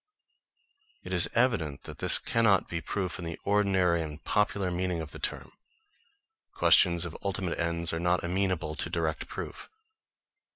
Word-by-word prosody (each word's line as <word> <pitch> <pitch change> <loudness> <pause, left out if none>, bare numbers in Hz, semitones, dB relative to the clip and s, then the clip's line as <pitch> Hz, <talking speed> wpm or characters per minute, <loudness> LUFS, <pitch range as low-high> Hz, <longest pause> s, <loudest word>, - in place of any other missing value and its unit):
It 90 - -6
is 90 -2 +3
evident 110 - +1
that - - -10
this - - +5
cannot 110 -5 +2
be 85 -1 -4
proof 95 -1 -3
in 85 - -6
the 85 0 -6
ordinary 95 -4 +2
and 75 -1 -7
popular 100 -3 +1
meaning 90 -1 -1
of 80 -2 -6
the - - -9
term. - - -4 1.0
Questions 85 -2 +5
of 85 - -7
ultimate 95 -3 -2
ends 85 -1 0
are 80 - -1
not 90 +1 +1
amenable 90 -3 -1
to 75 - -3
direct 80 -2 -2
proof. - - -7
90 Hz, 155 wpm, -29 LUFS, 85-95 Hz, 1.0 s, this